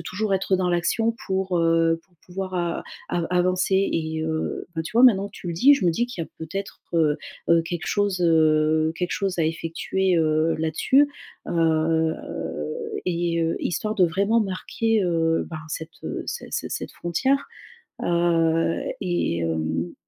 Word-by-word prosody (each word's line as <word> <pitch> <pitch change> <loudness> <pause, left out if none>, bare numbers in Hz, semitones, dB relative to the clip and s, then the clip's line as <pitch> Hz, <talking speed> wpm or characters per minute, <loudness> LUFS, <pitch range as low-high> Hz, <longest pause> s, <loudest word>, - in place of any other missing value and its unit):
toujours 205 +4 -2
être 190 0 +1
dans 180 -1 0
l'action 225 +7 +1
pour, 190 -1 0
heu, 165 0 +3
pour 185 - -33
pouvoir 185 +1 -5
a 175 -1 -1 0.3
av 170 -1 0
avancer 180 +1 +2 0.2
et 160 -1 -2
heu, 160 0 -2
ben, 160 - -2
tu 160 - -8
vois, 235 - +4
maintenant 200 -6 +6
que - - -24
tu - - -9
le - - -2
dis. 265 +13 +6
Je 265 - -2
me 170 - +4
dis 235 +8 0
qu'il 215 -9 -5
y - - -13
a - - -24
peut-être, 195 +5 -6
heu 155 -3 +3 0.3
heu, 170 -1 +5
quelque 170 0 -5
chose, 205 -3 0
heu, 155 -1 +3
quelque 180 -1 -2
chose 195 -3 -2
à 165 - +3
effectuer, 165 +3 0
heu, 155 0 +2
là-dessus, 160 - +3 0.4
heu, 160 -1 +2 0.9
et 170 -1 0
heu, 165 - 0
histoire 215 +6 -2
de 190 -5 +4
vraiment 200 +7 +2
marquer, 215 +3 0
heu, 165 -1 +1
ben, 160 - -6
cette, 160 0 -5
heu, - - -3
ce - - -4
ce - - -3
cette - - -5
frontière. 265 +12 0 0.6
Heu, 165 -1 +2 0.2
et 175 - 0
hem 80 +1 -2
170 Hz, 170 wpm, -24 LUFS, 160-190 Hz, 0.9 s, maintenant